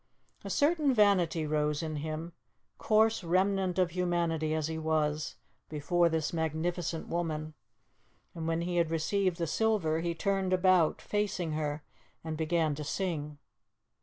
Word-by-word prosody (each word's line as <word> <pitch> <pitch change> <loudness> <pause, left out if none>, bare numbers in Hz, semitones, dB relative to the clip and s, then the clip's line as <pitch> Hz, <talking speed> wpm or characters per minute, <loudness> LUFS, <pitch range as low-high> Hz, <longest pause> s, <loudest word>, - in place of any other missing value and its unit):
A - - -6
certain 295 -3 +2
vanity 185 -7 +3
rose 150 0 0
in 155 -1 -3
him, 155 +3 -5 0.5
coarse 220 -1 +3
remnant 185 +1 +1
of 180 -2 +2
humanity 170 -3 0
as 155 -1 -1
he 160 0 -4
was, 155 -1 0 0.3
before 170 +3 +2
this 160 -1 -1
magnificent 165 +1 -2
woman, 155 -2 -3 0.8
and 165 -2 -5
when 165 0 0
he 175 +1 -2
had 170 -2 +2
received 175 +3 0
the 170 - -1
silver, 170 -3 +1
he 170 0 -2
turned 195 +1 0
about, 185 -3 +3
facing 205 -5 -1
her, 150 -1 -2 0.4
and 160 -1 -4
began 160 -1 +1
to 150 +1 -5
sing. 150 -3 -3
165 Hz, 140 wpm, -30 LUFS, 155-185 Hz, 0.8 s, vanity